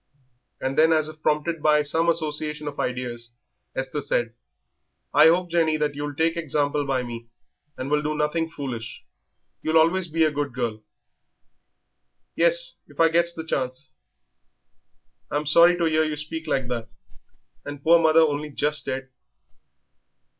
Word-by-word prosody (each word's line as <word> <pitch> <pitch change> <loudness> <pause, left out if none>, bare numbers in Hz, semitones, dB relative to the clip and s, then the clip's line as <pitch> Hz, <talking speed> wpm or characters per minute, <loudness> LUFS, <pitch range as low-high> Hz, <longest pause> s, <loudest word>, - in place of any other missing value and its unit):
And 135 +3 -1
then, 160 +1 +5
as 155 -1 +2
if 155 0 -13
prompted 155 +2 0
by 150 0 +4
some 165 +3 +1
association 150 -2 -2
of 145 - -6
ideas, 120 -2 -3 0.5
Esther 135 +3 -3
said, 120 -4 -1 0.8
"I 155 - +7
hope, 175 +1 +2
Jenny, 160 -2 +2
that 150 -1 -1
you'll 145 0 -5
take 165 +2 +1
example 145 -3 -1
by 130 -2 0
me 115 -1 -8 0.5
and 130 - -4
will 150 0 +2
do 150 0 -2
nothing 160 +2 0
foolish; 130 -8 -6 0.6
you'll 160 +1 +2
always 170 +3 +3
be 165 0 +1
a 155 - +3
good 145 -3 -3
girl." 115 -4 -3 1.5
"Yes, 170 0 +2
if 145 - -19
I 165 0 +6
gets 170 +1 +1
the 160 - -5
chance." 130 -2 -4 1.4
"I'm 145 +1 -2
sorry 170 +4 +6
to 170 - +1
'ear 160 0 +2
you 155 -1 -2
speak 160 +2 -5
like 135 -4 0
that, 115 -2 -4 0.7
and 145 -1 -8
poor 170 +1 +6
mother 160 0 +5
only 150 -1 0
just 150 +1 -1
dead." 135 0 -4
150 Hz, 155 wpm, -24 LUFS, 140-160 Hz, 1.5 s, I